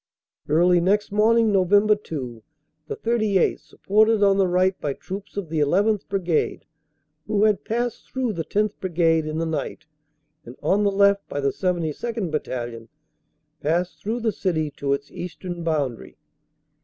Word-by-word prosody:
Early 175 +3 +4
next 200 +4 +1
morning, 220 +2 +3
Nov. 185 -3 +2
2, 200 - +1 0.5
the 435 - -4
38th., 220 - +1
supported 215 +1 +2
on 195 -1 +4
the 190 - +4
right 185 +1 +2
by 145 - -1
troops 195 +7 -8
of 190 -5 -4
the 160 -1 -1
llth. 200 +8 +2
Brigade, 180 -5 -1 0.6
who 210 -1 +1
had 210 -3 +2
passed 240 +1 -3
through 255 -4 -1
the 165 -3 -3
10th. 210 +5 0
Brigade 165 -3 +1
in 155 0 -3
the 165 - -1
night, 160 -1 -4 0.6
and 120 - -11
on 200 +2 +2
the 200 - +3
left 200 0 +3
by 145 - -3
the 140 -1 +1
72nd. 180 - -2
Battalion, 120 -6 -4 0.7
passed 175 +4 -1
through 230 +4 -2
the 225 -1 +1
city 160 -7 -1
to 140 0 -1
its 140 +1 -4
eastern 175 0 -6
boundary. 145 -7 -2
185 Hz, 155 wpm, -23 LUFS, 160-210 Hz, 0.7 s, Early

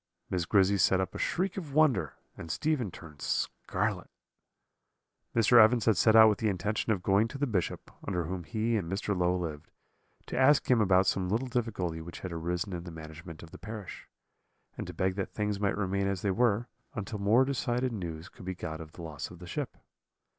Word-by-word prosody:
"Miss 90 -2 0
Grizzy 100 +1 +3
set 95 0 +4
up 95 0 -2
a - - -6
shriek 185 +1 -1
of 150 -7 -6
wonder, 120 - +3 0.2
and 80 - -9
Stephen 145 - 0
turned 80 -4 -12
scarlet. - - -2 1.3
"Mr. 115 0 +7
Evans 115 +1 +3
had 110 - +4
set 110 +4 +4
out 110 0 +10
with 105 -3 +2
the 110 - +1
intention 105 +4 -1
of 95 -4 -1
going 100 +3 +3
to 125 - -7
the 145 - +1
Bishop, 100 -9 -2
under 90 -3 -1
whom 90 +2 -4
he 115 +6 -1
and 90 -4 -3
Mr. 100 +1 -1
Low 90 0 +2
lived, 80 -3 -5 0.6
to - - -6
ask 130 +2 +4
him 120 -3 +5
about 95 -2 +4
some 95 -1 +1
little 115 +6 0
difficulty 105 -10 -2
which 85 +1 -9
had 90 - -5
arisen 90 +4 -2
in 85 -1 -4
the - - -6
management 80 +1 -10
of 80 - -12
the - - -11
parish, 110 -3 -8 0.7
and - - -5
to 90 - -6
beg 95 +2 +1
that 95 - -4
things 105 -1 -1
might 100 -1 0
remain 100 -1 0
as 100 -2 -2
they 100 - +2
were, 115 +2 +2 0.3
until 105 -1 -4
more 110 +6 +4
decided 125 -2 -1
news 85 -5 -5
could - - -13
be 95 0 -3
got 80 -2 -5
of 80 -1 -11
the 85 - -9
loss 75 -2 -6
of 90 - -12
the 90 - -10
ship. 90 - -4
100 Hz, 210 wpm, -30 LUFS, 90-115 Hz, 1.3 s, out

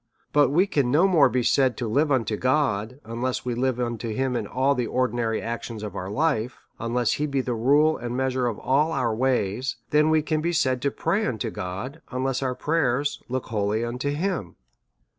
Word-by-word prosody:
But 145 -3 +5
we 170 +7 +3
can 140 -10 0
no 160 +9 +4
more 160 -8 +5
be 125 +1 0
said 130 -1 +2
to 120 - -2
live 145 +7 +1
unto 115 -5 +1
God, 130 -2 0
unless 120 +3 -3
we 125 - -1
live 125 +1 0
unto 120 -1 -2
him 130 +3 -1
in 110 -4 -2
all 135 +5 +2
the 125 -4 -1
ordinary 120 -3 0
actions 115 -1 -5
of 105 -2 -6
our 95 0 -4
life, 125 -1 0 0.2
unless 120 0 0
he 150 - -1
be 140 -1 -1
the 125 -1 -1
rule 145 +7 +3
and 120 +1 -4
measure 130 -1 0
of 115 - -2
all 150 +5 +1
our 125 -5 0
ways, 125 0 0 0.2
than 150 +1 +4
we 155 -1 +3
can 155 0 0
be 170 +2 -1
said 130 -5 +1
to 140 - +1
pray 185 +9 0
unto 110 -4 -2
God, 105 - -6
unless 130 +1 -1
our 130 -1 -1
prayers 145 -3 0
look 130 0 -3
wholly 110 +1 0
unto 125 +4 -3
him. 150 - -2
130 Hz, 200 wpm, -25 LUFS, 115-145 Hz, 0.2 s, But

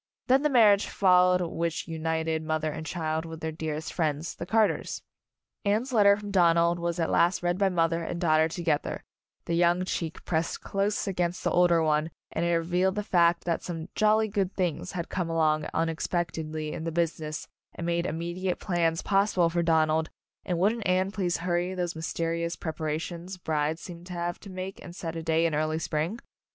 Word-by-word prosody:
Then 265 +1 +4
the 300 - +2
marriage 215 -6 +5
followed 180 -1 +4
which 165 -1 -2
united 160 0 -1
mother 155 0 -1
and 160 +1 -6
child 160 -1 -2
with 160 -1 -8
their 160 0 -3
dearest 155 0 -4
friends, 155 -1 -1
the 170 - -7
Carters. 220 0 +1 0.6
Anne's 220 +6 0
letter 200 -3 +6
from 205 -1 -7
Donald 170 -2 +4
was 170 0 -2
at 165 - 0
last 175 +1 +3
read 175 +1 0
by 195 -1 +3
mother 165 -2 +1
and 170 +1 -4
daughter 160 -2 +3
together, 165 -3 -2 0.4
the 170 - -2
young 175 +1 +3
cheek 165 -3 -4
pressed 165 -1 -1
close 200 +1 -1
against 180 -2 -1
the - - +1
older 175 -2 +4
one, 155 0 +1 0.2
and 165 - -1
it 170 0 +2
revealed 180 +3 +1
the 210 - -1
fact 170 -4 +3
that 170 -2 -1
some 165 -1 -6
"jolly 215 +1 +3
good 200 -3 -1
things" 180 -1 -2
had 170 -2 -3
come 180 -3 -2
along 155 -2 +1
unexpectedly 160 -1 -2
in 160 - -5
the 165 - -2
business, 160 -2 -2 0.3
and 170 - -5
made 170 0 0
immediate 175 +3 -3
plans 170 -3 0
possible 195 -4 +2
for 170 0 +1
Donald, 160 -1 +2 0.3
and 180 -3 -1
wouldn't 210 +4 +1
Anne 185 +1 +2
please 185 -3 -1
hurry 175 +1 0
those 175 -2 -2
mys 160 0 -4
terious 170 0 -2
preparations 165 +3 -4
brides 155 -1 -1
seem 170 -1 -9
to 180 - -8
have 175 0 -3
to 200 - -11
make 185 +1 -6
and 175 - -10
set 165 -2 -5
a 165 - -3
day 160 0 +2
in 165 - +1
early 155 +1 0
spring? 160 +5 -2
170 Hz, 190 wpm, -28 LUFS, 160-185 Hz, 0.6 s, letter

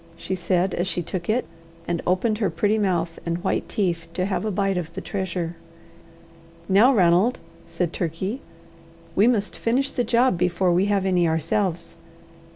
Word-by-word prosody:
she 190 - -4
said 185 0 0
as 175 - -1
she 175 -2 -1
took 175 +1 -5
it, 235 +4 +1 0.4
and 170 -1 -1
opened 210 +4 +1
her 205 - +1
pretty 205 +6 +1
mouth 175 -4 0
and 170 +1 -3
white 190 - -1
teeth 170 -5 -1
to 185 - 0
have 195 +1 -1
a 215 - -1
bite 195 -1 0
of 170 -3 -3
the - - -3
treasure. 180 -3 -3 1.1
"Now, 210 +7 +6
Ranald," 190 +2 +3 0.3
said 175 -3 -2
Turkey, 190 - -3 0.7
"we 205 +4 +5
must 215 -5 0
finish 260 +4 +1
the 245 - 0
job 235 -4 +2
before 180 +1 +2
we 180 +3 +3
have 200 -2 +1
any 180 -3 +2
ourselves." 165 +2 -1
185 Hz, 165 wpm, -24 LUFS, 175-210 Hz, 1.1 s, Now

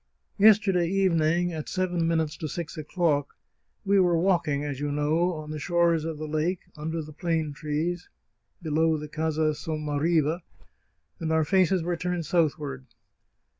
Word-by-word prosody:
" - - -46
Yesterday 195 -5 +3
evening, 175 -2 +2
at 155 -2 -5
seven 180 -3 0
minutes 160 -2 0
to 155 - -4
six 165 +2 -5
o'clock, 155 -2 -1 0.5
we 200 0 +4
were 175 -2 +3
walking, 165 -5 +1
as 140 -2 -4
you 145 0 -2
know, 155 +5 +1
on 155 -1 -7
the 155 - -4
shores 170 0 +2
of 165 -2 -4
the 155 - -5
lake, 155 +4 -1
under 160 +2 -4
the 155 0 -11
plane 160 -2 -1
trees, 155 +4 -3 0.5
below 160 0 +2
the 150 0 -6
Casa 155 0 0
Sommariva, 155 +2 0 0.8
and 160 -1 -2
our 160 0 +3
faces 185 0 +3
were 175 +1 -1
turned 180 -1 -2
southward. 145 -5 -1
160 Hz, 155 wpm, -26 LUFS, 150-175 Hz, 0.8 s, we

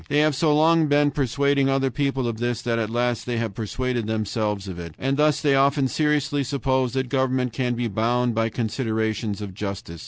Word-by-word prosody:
They 145 - +1
have 150 -1 +3
so 155 +2 +2
long 160 +1 +4
been 145 0 +3
persuading 140 +1 +1
other 135 -1 +1
people 135 -2 -1
of 115 -2 -4
this 120 -1 -2
that 115 -1 0
at 110 -2 -1
last 120 +1 -1
they 120 -1 -1
have 115 -3 -2
persuaded 120 +2 -3
themselves 105 -2 -2
of 90 -2 -6
it; 85 -2 -8
and 135 +1 -1
thus 150 0 +2
they 145 -2 +3
often 135 0 +3
seriously 145 -1 0
suppose 130 -2 0
that 130 -1 -1
government 130 -2 0
can 125 0 -1
be 120 0 -1
bound 120 +3 0
by 115 0 0
considerations 110 -2 -2
of 100 -2 -7
justice. 100 -4 -6
125 Hz, 205 wpm, -23 LUFS, 110-140 Hz, -, long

